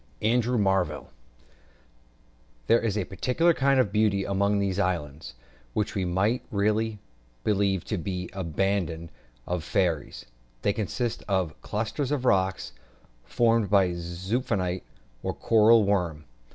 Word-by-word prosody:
ANDREW 120 +2 +2
MARVELL. 95 - 0 1.5
There 115 - +4
is 110 -3 -1
a 100 - -1
peculiar 130 - +1
kind 135 -2 +2
of 105 -6 +2
beauty 105 -2 +2
among 100 +1 +1
these 100 -1 0
islands, 80 -8 -2 0.4
which 105 - -1
we 95 -2 -1
might 100 +7 +1
really 105 +1 0 0.5
believe 100 -3 +1
to 105 - -2
be 90 +1 -3
the 95 - -9
abode 85 -1 -1 0.4
of 90 -2 -2
fairies. 85 -4 -1 0.4
They 100 - +2
consist 115 +3 -3
of 95 -5 0
a - - -19
cluster 110 +7 -3
of 140 -1 -1
rocks, 95 -4 +1 0.5
formed 115 -3 +2
by 95 -3 +4
the 85 0 -4
zoophyte, 90 +1 -2 0.4
or - - -3
coral 115 0 +5
worm. 90 -6 0
100 Hz, 135 wpm, -27 LUFS, 90-110 Hz, 1.5 s, coral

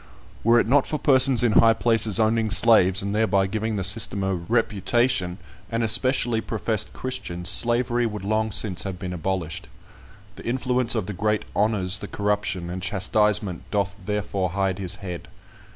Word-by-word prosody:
Were 115 +1 +5
it - - +1
not 140 +3 +3
for 155 - -2
persons 130 -3 +4
in 120 - +3
high 115 +1 +5
places 115 -3 +1
owning 110 0 +1
slaves, 100 -3 +4
and 100 0 -3
thereby 105 -3 +2
giving 110 +3 -3
the 95 - -2
system 100 +1 +2
a 95 0 0
reputation, 105 +1 0 0.3
and 115 0 -1
especially 120 0 +1
professed 110 -1 -2
Christians, 90 -9 -4
Slavery 120 +3 +1
would 105 -3 -6
long 110 +2 0
since 95 -3 0
have 95 -2 -5
been 90 -1 -6
abolished. 90 -1 -4 0.7
The - - -10
influence 125 -1 0
of 110 -5 -1
the 105 - -5
great 105 +3 -1
"honours 100 -3 0
the - - -7
corruption, 100 -4 -2
and 90 +1 -5
chastisement 100 -1 0
doth 100 -1 -1
therefore 100 -2 -2
hide 95 -1 -1
his 95 -3 -2
head." 90 -2 -6
105 Hz, 165 wpm, -23 LUFS, 95-115 Hz, 0.7 s, Were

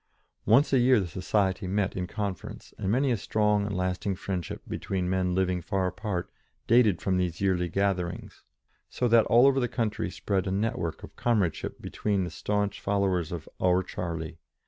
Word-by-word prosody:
Once 135 +6 +5
a 135 - +5
year 125 -1 +5
the 95 - -1
society 95 +2 0
met 100 +1 0
in 90 -1 -2
conference, 100 -3 -5
and 95 - -2
many 130 +3 +2
a 120 - +1
strong 105 0 +1
and 100 - -3
lasting 90 +1 -1
friendship 90 -2 -4
between 95 -2 -2
men 90 -1 0
living 90 -1 +1
far 95 +2 -1
apart 90 0 -3 0.3
dated 115 -6 +4
from 95 -1 0
these 90 -2 -1
yearly 90 -3 +1
gatherings, 90 -2 -2 0.5
so 125 - 0
that 115 -1 +5
all 120 +3 +6
over 135 -1 +4
the 125 - +1
country 110 -4 -2
spread 95 +1 -2
a - - -1
net 105 +4 0
work 85 -2 -4
of - - -11
comradeship 105 -9 0
between 100 -3 -1
the 90 - -4
staunch 105 +3 -2
followers 95 -4 0
of 85 -3 -6
"our 90 0 +3
Charlie." 85 -3 -5
95 Hz, 180 wpm, -28 LUFS, 90-105 Hz, 0.5 s, all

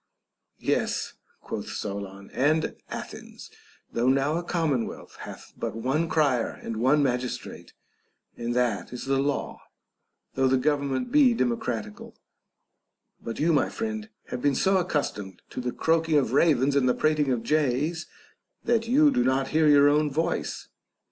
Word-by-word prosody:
Yes, - - -1 0.3
quoth - - -5
Solon, 100 -1 -6
and 155 +4 +1
Athens, - - -8 0.4
though 120 +2 +2
now 135 +3 +2
a 170 - -1
com 165 -3 0
monwealth, 125 -4 -4
hath - - -10
but - - -4
one 135 +8 0
crier 140 -7 +2
and 115 - -4
one 135 +6 +3
magistrate, 125 -2 -3 0.6
and 120 0 -3
that 120 -4 0
is 125 - -6
the 135 0 +1
law, 140 +1 -2 0.7
though 135 0 +2
the 130 0 +3
government 145 - 0
be 275 -5 +5
democratical; 115 - -3 1.1
but 115 - -5
you, 165 +2 +3
my 145 - +2
friend, 220 -1 -4 0.2
have 125 - -4
been 145 0 +2
so 190 +5 +3
accustomed 140 - -2
to - - -4
the 125 0 -2
croaking 160 +1 +2
of 130 -4 +1
ravens 140 -2 +3
and 130 -2 +3
the - - +2
prating 150 -3 +1
of 120 -3 -1
jays, 150 +4 0 0.6
that 230 -1 +1
you 290 +4 +5
do 255 -2 +2
not 130 +1 +1
hear 155 0 +3
your 145 -1 +6
own 150 +1 +3
voice. 160 +4 -2
140 Hz, 150 wpm, -26 LUFS, 125-160 Hz, 1.1 s, your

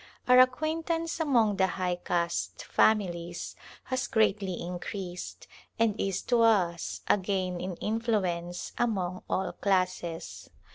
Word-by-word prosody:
Our 250 0 +7
ac 255 0 +8
quaintance 325 +3 -2
among 235 -10 +3
the 190 - +4
high 180 -1 0
caste 170 -1 -2
families 175 -5 +1 0.3
has 255 0 -2
greatly 205 -4 +1
increased 180 +1 -6 0.3
and 225 -2 +3
is 195 -1 -1
to 240 -1 +2
us 185 -7 +2
a - - +4
gain 185 -2 -2
in 180 -1 -4
influence 190 -6 -2
among 190 -6 0
all 190 - 0
classes. 185 -4 -2
190 Hz, 125 wpm, -29 LUFS, 175-230 Hz, 0.3 s, ac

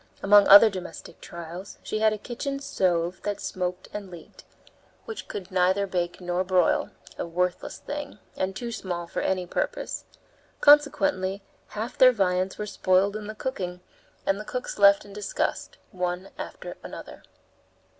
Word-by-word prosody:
Among 205 0 +7
other 205 +3 +10
domestic 185 -2 -8
trials, 170 +3 -8
she 215 - -2
had 220 0 +4
a 215 - -2
kitchen 275 +5 -4
stove 180 -9 0
that 205 -1 -3
smoked 180 0 -3
and 205 -2 -6
leaked, 170 -3 -13 0.6
which 450 -3 -7
could 195 -2 -7
neither 185 +2 +2
bake 175 -2 -2
nor 180 0 -1
broil, 185 -2 +2 0.3
a - - -1
worthless 180 +1 -2
thing, 290 -6 -6 0.2
and 190 0 -2
too 235 +4 -4
small 175 -6 -4
for 170 - -4
any 185 -1 0
purpose. - - -3 0.5
Consequently 285 -9 +4 0.2
half 220 +3 -6
their 255 -1 +9
viands 185 -4 0
were 210 - -3
spoiled 195 0 +2
in 215 -1 -5
the 215 - -6
cooking, 180 -7 -4 0.4
and 195 +1 +1
the - - -5
cooks 250 +1 -5
left 200 0 +6
in 200 - -12
disgust, 205 0 -3
one 180 +1 -3
after - - -7
another. - - -9
195 Hz, 155 wpm, -26 LUFS, 180-215 Hz, 0.6 s, other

